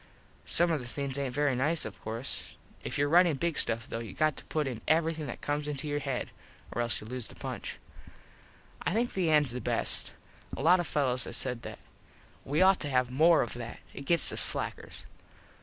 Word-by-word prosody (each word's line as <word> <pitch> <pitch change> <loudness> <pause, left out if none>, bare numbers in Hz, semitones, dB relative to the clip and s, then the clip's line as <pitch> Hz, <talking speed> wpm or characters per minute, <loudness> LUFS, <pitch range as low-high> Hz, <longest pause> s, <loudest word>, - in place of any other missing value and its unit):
Some 175 0 +2
of 155 -4 0
the 120 - -8
things 140 +1 -4
aint 130 -3 -3
very 145 -2 +2
nice 155 +6 +1
of 100 -4 -8
course. 115 +4 -5 0.3
If - - -3
your 145 - +2
ritin 170 -1 +4
big 170 -3 0
stuff 115 -1 +1
though 115 - -4
you 115 -4 -7
got 155 -1 +1
to - - -8
put 155 -2 -1
in 125 -4 -5
everything 160 -1 +1
that - - -7
comes 145 0 -2
into 150 0 -3
your 145 0 -1
head, 135 -3 -3 0.4
or 120 - -2
else 120 -1 0
you - - -11
lose 125 +1 -4
the - - -11
punch. - - -6 1.0
I - - -1
think 235 +3 0
the 180 -4 0
ends 150 -4 +3
the 125 +1 -5
best. - - +1 0.4
A - - -4
lot 180 +3 +6
of 175 - -2
fellos 130 -4 +1
has - - -1
said 125 -3 -1
that. - - -8 0.7
We 150 +6 +2
ought 190 0 +5
to 145 - 0
have 125 -2 +1
more 160 +5 +5
of 120 - -6
that. 120 -1 -7
It 140 - -8
gets 170 -2 +4
the - - -4
slackers. - - +3
145 Hz, 215 wpm, -30 LUFS, 125-160 Hz, 1.0 s, lot